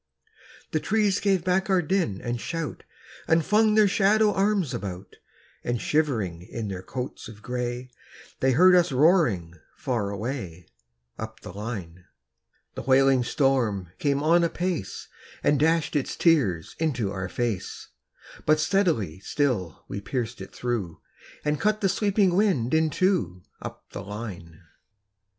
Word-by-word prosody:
The - - +1
trees 210 -3 +1
gave 195 -4 +1
back 185 +2 +1
our 185 -2 +3
din 165 - 0
and 120 -1 -3
shout, 165 -3 -4 0.5
And 160 -1 +3
flung 215 +1 +4
their 215 -1 +6
shadow 210 +2 +3
arms 195 -6 +1
about; 95 -1 -6 0.5
And 120 -1 -1
shivering 110 - 0
in 105 +4 -6
their 95 -1 -5
coats 125 +6 -6
of 110 -1 -13
gray, 125 +1 -4 0.5
They 130 0 +3
heard 180 +7 +6
us 175 -3 +4
roaring 130 - +3 0.2
far 115 -6 -2
away, 100 - -5 0.5
Up 110 0 -7
the 105 - -9
line. 95 -5 -6 0.7
The - - -5
wailing 135 -1 +4
storm 120 - +1
came 140 -1 +1
on 170 +2 +4
apace, 170 - -2 0.4
And 145 -2 +3
dashed 160 +1 +2
its 145 - -1
tears 125 - +2
into 130 -11 0
our 95 -2 -4
fade; 115 -5 -1 0.9
But 155 0 +5
steadily 155 - +1
still 100 - -1
we 100 - -5
pierced 115 +2 -3
it 95 - -8
through, 110 -9 -3 0.5
And 150 -1 0
cut 215 0 +2
the 195 - +3
sweeping 200 -1 +2
wind 180 - +2
in 160 0 +3
two, 140 - 0 0.2
Up - - -8
the - - -6
line. 95 -6 -8
130 Hz, 140 wpm, -26 LUFS, -, 0.9 s, their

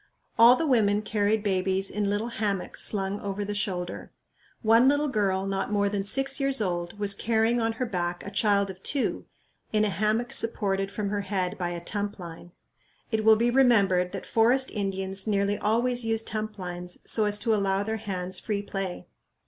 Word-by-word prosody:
All 235 +2 +8
the 325 - -1
women 215 -6 +2
carried 210 0 0
babies 190 -1 0
in 205 -1 -1
little 210 +3 -1
hammocks 205 -5 -2
slung 195 -1 -1
over 200 0 -4
the 205 - -3
shoulder. 185 -4 -4 0.5
One 230 +3 +5
little 290 +1 +1
girl, 195 -5 0
not 195 +1 -2
more 205 -1 +2
than 200 -1 -2
six 270 +7 +1
years 275 -1 +1
old, 175 -2 -2
was 205 -1 +2
carrying 225 +2 +1
on 225 0 0
her 250 +3 -2
back 175 -5 -3
a 200 - -6
child 200 -2 +2
of 185 0 -15
two, 280 +5 -1 0.5
in 215 0 +2
a - - +1
hammock 215 +6 0
supported 195 -4 0
from 200 0 -3
her 205 0 -1
head 190 -2 -2
by 175 -1 -3
a 170 0 -6
tump 205 -1 -3
line. 175 -1 -10 0.6
It 220 -1 0
will 220 0 +7
be 235 +2 +1
remembered 200 -9 +3
that - - -5
forest 245 +4 +2
Indians 195 -1 -3
nearly 200 0 +1
always 240 +3 +1
use 225 0 0
tump 215 -1 -4
lines 180 -1 -6
so 220 - +1
as 205 0 0
to 225 +2 0
allow 195 -1 +1
their 220 +1 -2
hands 185 -3 -3
free 205 -2 -3
play. 195 -3 -5
205 Hz, 190 wpm, -27 LUFS, 195-225 Hz, 0.6 s, All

